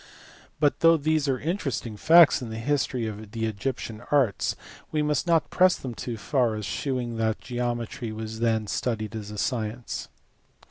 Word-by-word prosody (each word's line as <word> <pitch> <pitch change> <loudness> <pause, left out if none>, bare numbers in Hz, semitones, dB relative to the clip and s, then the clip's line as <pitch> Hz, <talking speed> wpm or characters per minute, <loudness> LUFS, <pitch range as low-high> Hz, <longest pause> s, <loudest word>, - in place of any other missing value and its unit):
But 145 -1 +2
though 165 0 +6
these 155 0 +1
are 130 -2 +1
interesting 140 - -2
facts 160 +6 +6
in 120 - -5
the 110 - -5
history 130 -1 0
of 110 -1 -7
the 115 -1 -1
Egyptian 110 0 -4
arts 135 -9 +2 0.4
we 150 -1 +1
must 150 +2 0
not 165 -2 +2
press 185 0 +5
them 130 -3 -6
too 115 0 -5
far 120 0 +1
as 105 -1 -4
shewing 120 +4 -2
that 110 -1 0
geometry 120 -2 -3
was 110 0 -6
then 115 -2 +1
studied 110 0 -2
as 105 -2 -6
a 105 - -7
science. 115 0 -3
120 Hz, 170 wpm, -26 LUFS, 110-145 Hz, 0.4 s, though